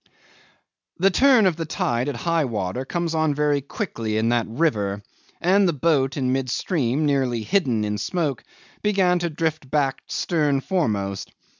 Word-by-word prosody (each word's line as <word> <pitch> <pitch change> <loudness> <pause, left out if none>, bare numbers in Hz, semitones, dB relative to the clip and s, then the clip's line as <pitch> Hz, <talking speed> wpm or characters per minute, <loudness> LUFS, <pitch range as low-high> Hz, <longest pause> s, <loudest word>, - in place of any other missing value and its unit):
'The 195 +3 +3
turn 255 +1 +5
of 180 -4 +2
the 165 - -3
tide 125 -3 -1
at 140 - -4
high 165 +5 0
water 105 +1 -3
comes 170 +2 -2
on 155 -2 +1
very 145 -1 +1
quickly 115 - -4
in 110 +1 +1
that 120 -2 +1
river, 105 -7 0 0.4
and 190 +3 +3
the 170 - +1
boat 140 -3 +1
in 130 -2 0
mid 135 -1 -1
stream, 145 -1 0
nearly 130 -5 0
hidden 130 - +1
in 105 0 -2
smoke, 150 - -2 0.4
began 190 -4 +2
to 170 0 -1
drift 155 -3 -2
back 140 -2 0
stern 150 -5 0
foremost. 105 - -2
145 Hz, 160 wpm, -23 LUFS, 120-170 Hz, 0.4 s, turn